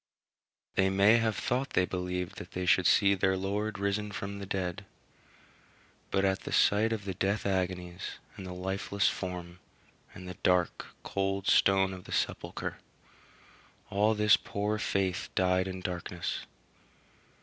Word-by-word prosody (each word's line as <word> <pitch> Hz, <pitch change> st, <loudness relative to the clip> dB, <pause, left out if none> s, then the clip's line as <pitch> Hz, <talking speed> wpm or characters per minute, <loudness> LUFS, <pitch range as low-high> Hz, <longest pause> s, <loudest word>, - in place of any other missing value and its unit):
They 95 Hz, 0 st, +3 dB
may 100 Hz, +4 st, +5 dB
have 110 Hz, -2 st, +1 dB
thought 130 Hz, +6 st, -1 dB
they 90 Hz, -, +3 dB
believed 90 Hz, +1 st, -3 dB
that 90 Hz, -, -9 dB
they 90 Hz, 0 st, -2 dB
should 90 Hz, 0 st, +4 dB
see 100 Hz, -1 st, +5 dB
their 95 Hz, 0 st, +2 dB
Lord 100 Hz, +2 st, -2 dB
risen 100 Hz, +1 st, -1 dB
from 100 Hz, +2 st, -5 dB
the 100 Hz, -, -6 dB
dead; 95 Hz, +1 st, -2 dB, 1.3 s
but 95 Hz, 0 st, +2 dB
at 95 Hz, 0 st, +1 dB
the -, -, -7 dB
sight 110 Hz, +3 st, +4 dB
of 110 Hz, -3 st, -3 dB
the 95 Hz, -, -2 dB
death 100 Hz, +4 st, -1 dB
agonies, 90 Hz, -2 st, -2 dB, 0.2 s
and -, -, -8 dB
the 90 Hz, -, -6 dB
lifeless 95 Hz, +2 st, -1 dB
form, 90 Hz, -1 st, -5 dB, 0.6 s
and 90 Hz, 0 st, -9 dB
the 90 Hz, -, -7 dB
dark, 90 Hz, -1 st, +1 dB, 0.2 s
cold 95 Hz, 0 st, -1 dB
stone 95 Hz, -1 st, +4 dB
of 90 Hz, -1 st, -9 dB
the -, -, -10 dB
sepulchre, -, -, -2 dB, 1.1 s
all 105 Hz, +2 st, +3 dB
this 105 Hz, 0 st, +5 dB
poor 105 Hz, +1 st, -2 dB
faith 95 Hz, -3 st, -1 dB
died 95 Hz, 0 st, +2 dB
in 95 Hz, 0 st, -5 dB
darkness. 90 Hz, -1 st, -4 dB
95 Hz, 150 wpm, -30 LUFS, 90-100 Hz, 1.3 s, may